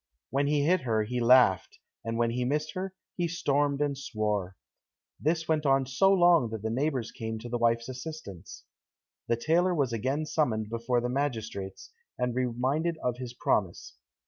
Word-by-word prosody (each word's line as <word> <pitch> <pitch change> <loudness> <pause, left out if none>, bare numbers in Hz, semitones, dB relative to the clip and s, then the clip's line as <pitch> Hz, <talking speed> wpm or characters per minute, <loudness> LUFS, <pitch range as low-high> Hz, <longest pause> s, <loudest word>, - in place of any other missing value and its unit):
When 140 +1 +1
he 145 -1 +2
hit 175 +3 +3
her 110 -4 +1
he 125 +3 -3
laughed, 120 -5 +4 0.3
and 115 0 -3
when 115 0 +1
he 125 +1 -1
missed 150 +4 -1
her, 190 0 -5 0.2
he 175 -1 +1
stormed 145 -4 0
and 145 -1 -1
swore. 105 -7 -2 0.6
This 160 +2 0
went 155 -1 +1
on 135 -2 +3
so 135 +10 +3
long 175 -9 +5
that 110 -1 -6
the 110 - -1
neighbors 130 -2 -1
came 110 -1 -5
to 120 +2 -8
the 120 0 -2
wife's 115 0 +2
assistance. 130 - -8 0.6
The 115 - +1
tailor 175 +7 +2
was 135 -6 0
again 135 +7 -1
summoned 110 -9 0
before 115 +1 0
the 125 - -2
magistrates, 110 -8 -3 0.3
and 125 -1 -1
reminded 130 +7 0
of 125 -1 -1
his 125 -1 -7
promise. 95 -7 -1
125 Hz, 170 wpm, -29 LUFS, 115-150 Hz, 0.6 s, long